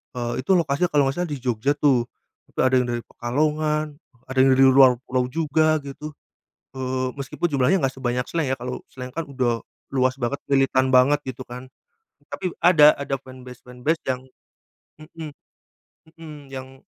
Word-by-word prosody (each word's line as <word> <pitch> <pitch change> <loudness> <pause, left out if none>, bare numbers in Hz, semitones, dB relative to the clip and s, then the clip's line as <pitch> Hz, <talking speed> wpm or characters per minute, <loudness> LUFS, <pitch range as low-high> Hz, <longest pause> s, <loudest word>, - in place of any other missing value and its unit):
Eee 120 +1 -3
itu 170 - 0
lokasi 160 +2 0
kalau 145 -2 +3
enggak 155 +7 -1
salah 170 - -5
di 140 - -4
Jogja 125 +2 0
tuh 140 -5 +3 0.5
tapi - - -9
ada 130 - +2
yang - - -5
dari 120 0 -2
Pekalongan, 150 +4 0 0.4
ada 130 - -7
yang 135 - +5
dari 135 - +5
luar 130 -2 +6
pulau 125 0 0
juga 155 0 +2
gitu. 140 +2 -8 0.6
Eee, 130 -1 -2
meskipun 140 +5 -2
jumlahnya 140 +8 +3
enggak 135 - -2
sebanyak 125 0 -1
Slank 165 -4 -1
ya, 130 - +1
kalo 125 +1 -5
Slank 125 -1 -9
kan 165 0 -3
udah 125 -4 -1 0.3
luas 130 0 +1
banget, 130 +2 -3
militan 135 -1 +3
banget 130 +3 +4
gitu 130 0 -7
kan. 125 +1 -9 0.6
Tapi 180 - -4
ada, 150 -4 +7
ada 140 -1 -3
fanbase-fanbase 125 +3 -5
yang 125 0 -1 0.8
mhm. 155 0 -9 0.9
Mhm, 150 -3 -11
yang 130 0 -9
135 Hz, 165 wpm, -23 LUFS, 125-150 Hz, 0.9 s, ada